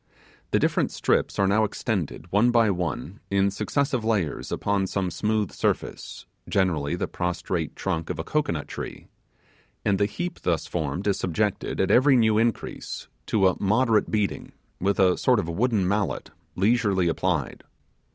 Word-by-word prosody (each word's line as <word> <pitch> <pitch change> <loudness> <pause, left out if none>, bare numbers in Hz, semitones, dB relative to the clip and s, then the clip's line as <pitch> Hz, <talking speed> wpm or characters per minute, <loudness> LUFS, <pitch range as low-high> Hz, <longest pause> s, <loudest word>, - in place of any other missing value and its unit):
The - - +2
different - - +1
strips - - 0
are 100 - +3
now 105 +3 +3
extended, 95 - -3
one 105 +5 +4
by 115 -3 +4
one, 90 - -3
in 100 0 +2
successive 135 +4 -1
layers, 105 -9 -1
upon 100 -1 0
some 95 -1 -1
smooth 105 0 0
surface - - -3 0.2
generally 80 -7 +1
the - - -2
prostrate 90 -2 -3
trunk 85 -4 -2
of - - -3
a - - -3
cocoanut 85 - -1
tree - - -7 0.8
and 100 -2 +2
the 100 - +3
heap 175 +12 -5
thus 80 -3 0
formed 80 +2 -3
is 100 -2 +1
subjected, 100 +3 -1
at - - +2
every 135 +2 +6
new 110 -3 +4
increase, 115 0 -2 0.2
to 100 -4 +3
a 90 - -1
moderate 110 +2 +3
beating, 105 -2 -1 0.3
with 100 +2 0
a 90 -2 +4
sort 125 -2 +3
of 100 -6 -1
wooden 105 +2 +1
mallet, 100 0 -1 0.2
leisurely 100 -3 +2
applied. 85 -4 -1
100 Hz, 155 wpm, -25 LUFS, 90-110 Hz, 0.8 s, every